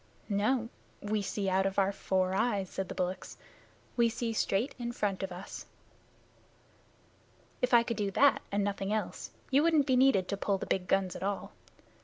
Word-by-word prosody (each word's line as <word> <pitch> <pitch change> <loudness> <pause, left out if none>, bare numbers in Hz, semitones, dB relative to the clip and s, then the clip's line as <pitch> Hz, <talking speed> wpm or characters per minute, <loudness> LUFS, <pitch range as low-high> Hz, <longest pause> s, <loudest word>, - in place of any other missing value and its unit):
"No. 220 +4 +1 0.3
We 210 0 -1
see 200 0 -2
out 190 +1 +2
of 195 +1 -4
our 195 0 +3
four 185 -1 0
eyes," 200 -2 0
said 190 -1 -4
the - - -5
bullocks. 185 0 -3 0.6
"We 235 -1 +4
see 230 0 -3
straight 215 +3 0
in 240 0 -3
front 200 -4 -1
of 190 -1 -3
us." 180 +2 -8 1.9
"If 250 - +1
I 235 -1 +7
could 235 -2 -3
do 205 -2 0
that 280 +8 +4
and 200 0 +1
nothing 200 0 -2
else, 215 0 -3 0.2
you 275 +2 +5
wouldn't 315 -3 +4
be 260 -2 +2
needed 250 -8 +4
to 200 - -1
pull 200 0 0
the - - -5
big 180 -1 -1
guns 195 -2 +1
at - - -7
all. 200 +1 -3
200 Hz, 185 wpm, -31 LUFS, 195-235 Hz, 1.9 s, I